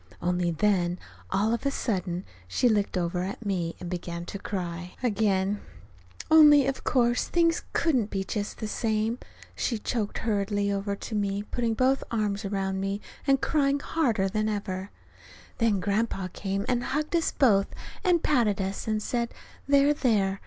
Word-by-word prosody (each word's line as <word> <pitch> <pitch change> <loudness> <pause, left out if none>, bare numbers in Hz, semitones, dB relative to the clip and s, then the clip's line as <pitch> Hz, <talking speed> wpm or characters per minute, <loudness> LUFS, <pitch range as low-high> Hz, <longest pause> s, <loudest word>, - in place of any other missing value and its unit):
Only 180 0 0
then, 175 0 +1 0.3
all 210 +4 +1
of 235 - -2
a 280 - +2
sudden 185 -8 -2 0.2
she 170 - +2
looked 205 -4 +1
over 175 0 -1
at 195 +4 -5
me 175 -4 -1
and 180 - -6
began 170 -1 -4
to 200 - -6
cry 180 -3 -5
again 205 -3 +1 0.7
only, 295 -3 +8
of 270 0 -2
course, 240 -1 +2
things 335 -1 +2
couldn't 255 -10 +2
be 195 -1 -2
"just 205 +1 -4
the 215 - -4
same," 220 +2 -1 0.4
she 235 - -1
choked, 215 -1 -2
hurrying 205 -2 0
over 200 0 -1
to 220 - -8
me 200 -2 0
and 210 - -14
putting 235 -2 0
both 260 +3 +2
arms 210 -2 -1
around 195 -1 -1
me, 195 +1 -2 0.3
and 270 -1 +4
crying 285 -2 +2
harder 240 -11 +1
than 215 +2 0
ever. 195 -2 -3 0.7
Then 225 -4 +3
Grandpa 200 -1 -1
came 195 0 -2
and 245 -1 +1
hugged 300 +5 -1
us 330 - +2
both, 200 -7 +4 0.4
and 355 -4 +3
patted 230 -9 +2
us, 195 +2 -3
and 215 -1 0
said, 235 0 -1 0.4
"There, 280 +1 +5
there!" 205 -8 +1
210 Hz, 165 wpm, -27 LUFS, 195-245 Hz, 0.7 s, only